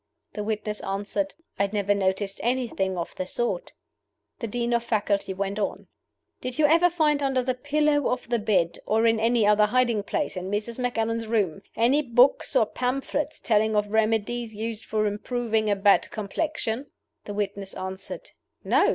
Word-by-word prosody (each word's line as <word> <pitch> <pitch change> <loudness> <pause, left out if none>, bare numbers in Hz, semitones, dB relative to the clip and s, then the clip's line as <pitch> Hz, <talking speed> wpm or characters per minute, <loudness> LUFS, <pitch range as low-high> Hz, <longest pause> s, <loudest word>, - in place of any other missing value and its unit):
The 210 - -3
witness 210 0 -2
answered, 205 +10 -3 0.2
"I 200 0 +2
never 205 -1 +1
noticed 195 0 -1
anything 230 -6 0
of 170 - -4
the 185 - -3
sort." 240 - -2 0.7
The 230 - -3
Dean 240 +2 -1
of 235 0 +2
Faculty 205 -4 0
went 200 +2 -2
on: 200 - -3 0.5
"Did 255 -1 -4
you 310 - +4
ever 335 +4 +5
find 305 -4 +2
under 270 -2 +1
the 255 +1 0
pillow 290 +2 +1
of 250 -1 -2
the 235 0 +1
bed, 185 -6 +1
or 225 +1 +3
in 225 -1 +4
any 230 0 +3
other 210 0 +5
hiding 240 -2 +2
place 200 - -2
in 185 +1 -4
Mrs. 215 +4 -3
Macallan's 230 -2 -1
room, 200 -6 0
any 250 +6 +3
books 250 0 +3
or - - +5
pamphlets 275 +6 -2
telling 220 -1 +2
of 210 0 +1
remedies 220 +1 0
used 220 0 -4
for 215 -1 0
improving 220 +1 -1
a 205 - +3
bad 200 0 +4
complexion?" 225 +3 -3 0.4
The 205 - -6
witness 200 -1 -3
answered, 190 +1 -6 0.3
"No." - - +4
220 Hz, 170 wpm, -26 LUFS, 205-250 Hz, 0.7 s, ever